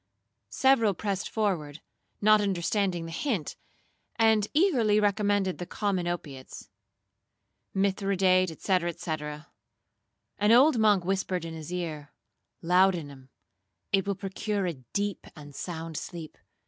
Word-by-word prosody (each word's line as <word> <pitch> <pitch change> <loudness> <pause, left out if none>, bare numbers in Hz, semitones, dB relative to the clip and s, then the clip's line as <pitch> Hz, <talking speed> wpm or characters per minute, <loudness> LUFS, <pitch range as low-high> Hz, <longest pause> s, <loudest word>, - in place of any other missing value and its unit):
Several 230 -7 +3
pressed 195 0 -3
forward, 170 -9 -2 0.4
not 215 0 +5
understanding 185 -2 0
the 165 - -7
hint, 195 - -2 0.6
and 220 -2 +3
eagerly 260 - +3
recommended 205 -2 +1
the 175 - -5
common 190 -3 -1
opiates—Mithridate, 185 +4 -3
&c. 180 -3 +1
&c. 165 - -5 1.3
An 210 +1 +3
old 255 +2 +6
monk 205 -5 +4
whispered 185 -2 -1
in 165 - -6
his 160 0 -8
ear, 155 -5 -5 0.5
'Laudanum,—it 175 +1 -1
will 200 - 0
procure 195 +1 -3
a 175 - -1
deep 185 - -4
and 145 -2 -12
sound 165 0 -6
sleep. 165 -3 -7
190 Hz, 110 wpm, -28 LUFS, 170-205 Hz, 1.3 s, old